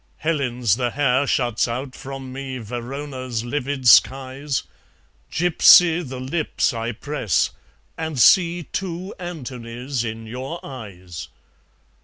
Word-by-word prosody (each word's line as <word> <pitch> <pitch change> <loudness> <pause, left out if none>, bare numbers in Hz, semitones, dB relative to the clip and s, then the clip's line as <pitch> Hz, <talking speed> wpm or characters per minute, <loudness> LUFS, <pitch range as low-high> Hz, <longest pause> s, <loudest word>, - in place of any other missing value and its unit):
Helen's 125 - 0
the 125 -2 0
hair 135 +1 +1
shuts 120 -6 +1
out 125 +3 -4
from 135 -1 -8
me 135 -1 -5
Verona's 125 +1 -5
livid 135 0 -2
skies; 135 +3 +4 0.7
Gypsy 175 0 +6
the 130 -5 -7
lips 140 +3 -1
I 115 0 -2
press; 120 - 0 0.5
and 160 -3 -3
see 175 - +5
Two 185 +2 -5
Antonys 125 -6 -5
in 115 0 -5
your 130 +8 -6
eyes. 95 - -8
130 Hz, 110 wpm, -22 LUFS, 120-150 Hz, 0.7 s, Gypsy